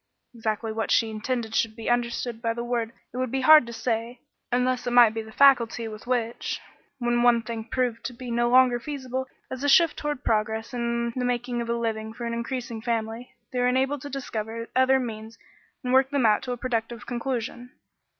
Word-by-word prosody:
Exactly 225 -1 -2
what 225 0 -2
she 225 -1 +3
intended 225 +1 -3
should 225 -1 +1
be 225 -1 -7
understood 240 -1 -1
by 230 -1 -1
the 235 - -3
word 240 -2 -1 0.2
it - - -6
would 255 -1 -1
be 265 +2 -1
hard 305 -2 +8
to - - -6
say, 230 +1 -2 0.3
unless 250 0 +1
it 245 - 0
might 240 -3 +7
be 225 - -3
the 220 0 -11
faculty 235 -3 +4
with 215 +1 -9
which, 240 -2 -1 0.4
when 240 -1 +1
one 240 -1 +4
thing 230 0 -5
proved 245 -1 -1
to - - -2
be 245 0 -7
no 240 0 +2
longer 250 -1 +5
feasible 260 -1 -4 0.2
as 260 +1 -5
a 285 - +2
shift 330 +2 +5
toward 295 -3 -3
progress 220 +1 0
and 235 -1 -1
the 255 - -1
making 245 0 -1
of 235 - -5
a 235 - +1
living 220 -1 -3
for 240 0 -6
an 235 - -2
increasing 235 -1 -4
family, 230 +1 -3 0.2
they 250 - -1
were 245 - +3
enabled 265 +2 +1
to 285 - -7
discover 230 -4 -5
other 260 +1 +4
means 225 -2 -6 0.5
and 250 0 -1
work 265 0 +5
them 280 -4 +1
out 215 -1 +4
to 250 - -5
a 245 - -2
productive 235 -1 -3
conclusion. 245 0 -4
240 Hz, 210 wpm, -26 LUFS, 230-255 Hz, 0.5 s, hard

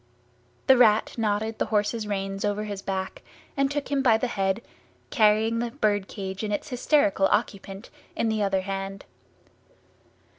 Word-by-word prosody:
The 265 - +6
Rat 220 -3 +4
knotted 220 0 -1
the - - 0
horse's 215 +1 0
reins 195 -1 -3
over 205 0 -1
his 205 -2 -5
back 190 -1 -4 0.3
and 275 0 +2
took 290 0 -3
him 280 -1 +2
by 235 -4 +5
the 225 - -1
head, 195 -1 -1 0.5
carrying 220 +1 +3
the 240 0 -1
bird 210 -6 0
cage 190 0 -6
and 210 - -2
its 205 - -3
hysterical 245 -7 +2
occupant 200 -1 -2 0.2
in 230 - 0
the 220 -1 0
other 195 -2 +1
hand. 195 0 -5
210 Hz, 155 wpm, -26 LUFS, 195-230 Hz, 0.5 s, The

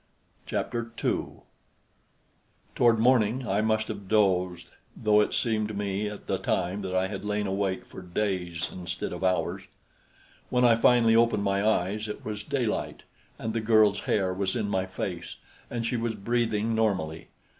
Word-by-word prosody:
Chapter 120 -1 -2
2 - - -2 1.3
Toward 120 -2 +4
morning, 120 +1 +3
I 100 0 +1
must 110 0 +1
have 100 -1 -6
dozed, 90 -5 +1 0.3
though 105 -1 +4
it - - 0
seemed 110 -4 0
to 105 - -6
me 100 +1 -2
at 105 - -9
the - - -1
time 95 +2 -1
that 95 -1 -3
I 95 0 +2
had 100 0 -6
lain 105 0 -1
awake 95 -1 -1
for - - -10
days, 90 -2 -2
instead 90 -1 -5
of 90 - -6
hours. 95 0 0 0.9
When 125 0 +3
I 120 - +7
finally 115 -1 +5
opened 115 -3 +3
my 100 0 +1
eyes, 105 0 +1
it 105 - -7
was 105 -1 -4
daylight, 125 -3 -2 0.3
and 110 - -4
the 115 - -1
girl's 110 -2 +4
hair 95 -3 0
was 95 0 -1
in 110 -4 -1
my 95 -1 0
face, 90 -3 -5 0.3
and 120 -1 -3
she 120 - 0
was 115 -1 -2
breathing 115 0 0
normally. 95 -8 -1
105 Hz, 165 wpm, -27 LUFS, 95-115 Hz, 1.3 s, I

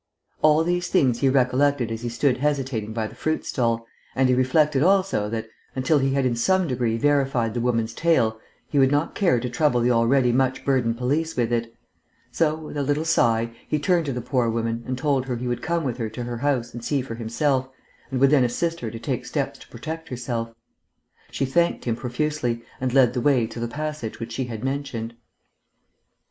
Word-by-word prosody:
All 155 +1 +5
these 175 +1 0
things 130 -10 +2
he 135 - +3
recollected 130 -1 +2
as 115 0 -4
he 120 - -3
stood 125 +2 +1
hesitating 135 -7 -1
by 110 0 -2
the - - -7
fruit 155 0 -2
stall, 115 -3 0 0.3
and 130 -1 +3
he - - +4
reflected 135 +3 +3
also 185 - +2
that, 115 0 -3 0.3
until 135 +3 +2
he 135 0 +1
had 135 -1 +1
in 125 -2 +1
some 185 +9 +2
degree 120 -4 0
verified 135 -4 +1
the 120 - -2
woman's 115 -2 0
tale, 115 -8 +2 0.3
he 145 - +1
would 135 -1 +5
not 145 +3 +1
care 175 -11 +2
to 125 - -3
trouble 125 +1 +1
the 120 +1 +2
already 120 +2 +3
much 130 +1 0
burdened 125 -4 +1
police 150 +6 -1
with 120 -1 +1
it; 115 -1 -1 0.6
so, 155 -2 +1
with 155 -1 -8
a - - 0
little 145 +3 0
sigh, 115 -6 +2 0.2
he 150 - 0
turned 165 +2 +1
to - - 0
the 125 -1 -3
poor 125 -2 +1
woman 115 0 -2
and 130 0 -2
told 135 -2 0
her 125 - -1
he 125 +1 -4
would 120 0 -2
come 170 0 -1
with 125 -4 -2
her 115 -2 -2
to 115 +3 -6
her 120 0 -4
house 125 -3 -1
and 120 0 -7
see 140 0 0
for 125 - -6
himself, 130 +4 0 0.4
and 130 -1 -2
would 135 +1 +5
then 140 -4 +5
assist 165 +8 -1
her 115 - -4
to 115 - -7
take - - -3
steps - - -3
to - - -14
protect 160 +1 -7
herself. 120 -2 -3 0.8
She 135 - -1
thanked 170 +6 +1
him 115 -2 0
profusely, 125 -1 -2 0.2
and 130 -1 -1
led 125 -2 +4
the 125 - -1
way 130 -3 +3
to 115 +1 -8
the 120 - -2
passage 150 -3 -5
which 115 0 -6
she 130 +3 -2
had 115 -2 -6
mentioned. 135 -4 -3
130 Hz, 210 wpm, -24 LUFS, 115-145 Hz, 0.8 s, All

